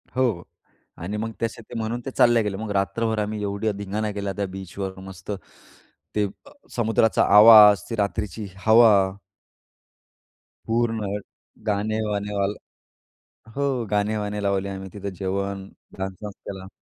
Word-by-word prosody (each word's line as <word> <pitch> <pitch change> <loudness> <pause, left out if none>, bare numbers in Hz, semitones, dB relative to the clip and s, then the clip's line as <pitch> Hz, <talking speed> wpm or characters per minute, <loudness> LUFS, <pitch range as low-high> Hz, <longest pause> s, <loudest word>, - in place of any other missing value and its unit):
हो. 115 -10 +1 0.5
आणि 100 +5 -4
मग 115 +1 -3
तसे 115 0 -2
ते - - -12
म्हणून 115 +2 -2
ते 135 - -4
चालले 120 -2 +4
गेले. 100 -2 -3
मग 110 -1 -5
रात्रभर 110 +3 0
आम्ही 105 0 -2
ऐव्हढा 100 +2 -1
धिंगाणा 105 +2 -3
केल्या 100 -1 -3
त्या 100 - 0
बीचवर 95 0 -6
मस्त. 95 +1 -9 0.8
ते 105 - +2 0.2
अ, - - -15 0.2
समुद्राचा 115 -1 +2
आवाज 105 -3 +9
ते 115 - -2
रात्रीची 105 0 -2 0.2
हवा. 110 0 +7 1.7
पूर्ण 115 -1 0 0.6
गाणे-वाणे 105 0 -1
वाल 100 +1 +1 1.0
हो 140 0 0 0.3
गाणे-वाणे 105 0 -1
लावले 100 0 0
आम्ही. 95 0 -6
तिथं 100 -1 -5
जेवण, 100 0 -3 0.3
डान्स 95 -1 -4
वांस 105 - -5 0.2
केला. 95 -1 -7
105 Hz, 130 wpm, -24 LUFS, 100-110 Hz, 1.7 s, आवाज